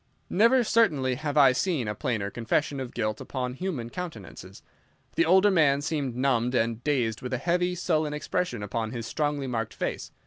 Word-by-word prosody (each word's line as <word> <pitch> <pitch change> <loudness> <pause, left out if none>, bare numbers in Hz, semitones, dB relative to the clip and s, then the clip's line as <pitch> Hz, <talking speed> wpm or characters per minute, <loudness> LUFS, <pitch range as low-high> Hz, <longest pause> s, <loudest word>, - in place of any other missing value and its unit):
Never, 235 +6 +4
certainly, 155 - +2
have 145 +3 -3
I 135 -3 +7
seen 135 - -1
a 105 - -1
plainer 110 -6 -2
confession 135 +4 -1
of 130 -2 -6
guilt 110 -2 -2
upon 125 -2 -4
human 135 -7 -4
countenances. 180 -3 -8 0.5
The 335 - +3
older 195 -2 +5
man 145 -6 +3
seemed 145 -5 -2
numbed 125 -1 +1
and 115 0 0
dazed 120 -7 0
with 125 0 -5
a - - +1
heavy, 180 +5 0
sullen 155 -4 0
expression 150 - -2
upon 110 +2 -3
his 115 -2 -4
strongly 145 +1 -1
marked 115 -4 -3
face. - - -4
135 Hz, 175 wpm, -27 LUFS, 120-165 Hz, 0.5 s, I